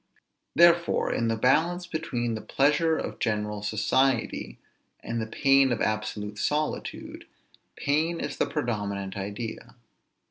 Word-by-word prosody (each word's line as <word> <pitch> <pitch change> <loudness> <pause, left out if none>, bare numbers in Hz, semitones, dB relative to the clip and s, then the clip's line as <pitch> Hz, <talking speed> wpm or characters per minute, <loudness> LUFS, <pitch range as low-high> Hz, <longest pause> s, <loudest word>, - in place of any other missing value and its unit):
Therefore 170 0 +4
in 115 - 0
the 115 - +1
balance 160 +10 +2
between 125 -9 -2
the 110 - -4
pleasure 155 +3 +2
of - - -5
general 105 -1 -1
society, 115 +3 0 0.4
and 115 0 -3
the 110 - -3
pain 135 +2 +4
of 120 - 0
absolute 105 -1 -2
solitude, 150 +1 -3 0.5
pain 160 +4 0
is 145 - -4
the - - +1
predominant 100 -4 -3
idea. 100 +3 -6
120 Hz, 120 wpm, -27 LUFS, 110-150 Hz, 0.5 s, Therefore